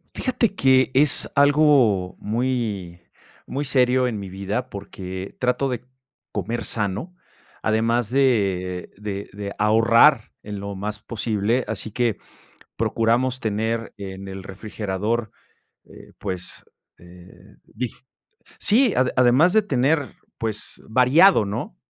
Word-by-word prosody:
Fíjate 235 -5 0
que 130 -3 +4
es 140 0 +3
algo 140 -10 +4
muy 110 -6 -2 0.5
muy 140 +2 -3
serio 130 -1 +3
en 115 -4 -2
mi 95 - -7
vida, 100 +7 -3
porque 95 -1 -7
trato 125 +2 +1
de 125 -2 -4 0.5
comer 115 0 -3
sano, 105 - -3 0.5
además 115 +1 +1
de 100 -9 +1
de 100 -1 -5
de 100 0 -6
ahorrar 115 +4 +4
en 105 -1 -6
lo 100 0 -5
más 105 +2 -4
posible, 110 +1 -1
así 110 0 -4
que 120 -3 0 0.6
procuramos 120 +3 +1
tener 115 +1 -2
en 95 -1 -7
el 95 0 -7
refrigerador, 105 +3 -3 0.6
eh, - - -15
pues, 95 -3 -5 0.4
eh, 90 +1 -16
dif 125 +2 -6 0.6
sí, 235 +1 +3
ade 125 0 +2
además 130 +8 +5
de 220 - +5
tener, 140 - 0 0.2
pues, 110 -2 -5
variado, 130 - +5
¿no? 100 - -5
115 Hz, 120 wpm, -23 LUFS, 100-130 Hz, 0.6 s, además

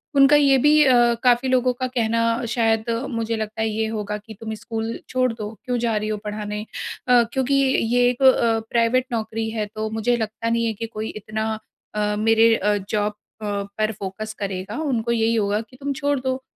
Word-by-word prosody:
उनका 275 +2 +7
ये 280 -2 +5
भी 300 +3 +5
अ, 240 -3 +5
काफ़ी 250 +1 +3
लोगों 255 -1 +2
का 255 +1 -3
कहना 230 -2 0 0.3
शायद 225 -1 +1 0.3
मुझे 230 0 -1
लगता 220 0 -4
है 220 - +1
ये 220 +1 -1
होगा 210 -1 -3
कि 220 +1 -12
तुम 220 -1 -5
स्कूल 225 0 -4
छोड़ 255 -1 +1
दो। 215 -1 -6
क्यों 250 -1 0
जा 230 -2 0
रही 215 +1 -2
हो 215 - -1
पढ़ाने? 210 0 -4 0.4
अ, 245 -1 +6
क्योंकि 265 +1 0 0.4
ये 245 0 +4
एक 250 +2 -4
अ, 235 -3 +5
प्राइवेट 240 +2 +2
नौकरी 225 0 -2
है 220 -1 -2
तो 215 0 -2
मुझे 220 +2 0
लगता 220 +1 -3
नहीं 230 0 +1
है 225 - 0
कि 230 +3 -5
कोई 220 0 -5
इतना 215 +1 -3 0.5
अ, 210 0 0
मेरे 225 +1 +4
अ, 210 -1 +1
जॉब 210 0 0 0.3
अ, - - -5 0.3
पर 215 0 +1
फोकस 215 +3 -5
करेगा, 195 +3 -4
उनको 235 -6 -1
यही 230 0 +2
होगा 210 0 +1
कि 255 +3 -16
तुम 280 0 -3
छोड़ 285 -1 0
दो। 260 0 -2
225 Hz, 200 wpm, -22 LUFS, 215-245 Hz, 0.5 s, उनका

